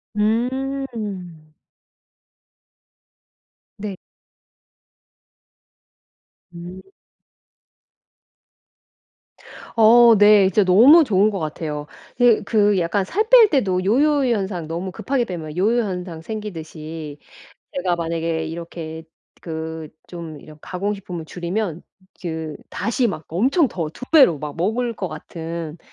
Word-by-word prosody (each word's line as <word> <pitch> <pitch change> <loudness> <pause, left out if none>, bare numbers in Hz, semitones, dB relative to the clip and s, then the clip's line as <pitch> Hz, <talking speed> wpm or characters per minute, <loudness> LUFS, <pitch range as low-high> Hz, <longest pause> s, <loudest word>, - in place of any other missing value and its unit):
음. 225 - -2 2.3
네. 200 -1 -5 2.6
음. 175 +2 -9 2.9
어 230 +1 +7
네. 205 -1 +6
진짜 205 +3 +3
너무 245 - +7
좋은 210 -5 +3
것 195 - -3
같아요. 150 -1 -5 0.3
으 240 -3 +5
그 205 -3 +3
약간 180 +3 0
살 425 - -1
뺄 475 -4 +8
때도 190 - +1
요요현상 230 - +1
너무 170 +4 -4
급하게 240 +6 -1
빼면 165 -5 -7
요요현상 185 -5 -1
생기듯이 160 -7 -7 0.6
제가 180 -1 0
만약에 165 -1 -2
이렇게 160 -1 -7 0.4
그 160 -1 -6 0.2
좀 165 -4 -8
이런 155 +1 -14
가공식품을 190 -2 -5
줄이면 175 +1 -4 0.4
그 160 -3 -4 0.2
다시 240 +2 0
막 160 -6 -5
엄청 260 - +2
더 165 -7 -4
2 165 - -9
배로 265 - +6
막 150 0 -7
먹을 230 +7 -1
것 190 -3 -4
같은 165 +1 -7
185 Hz, 180 characters per minute, -21 LUFS, 165-220 Hz, 2.9 s, 뺄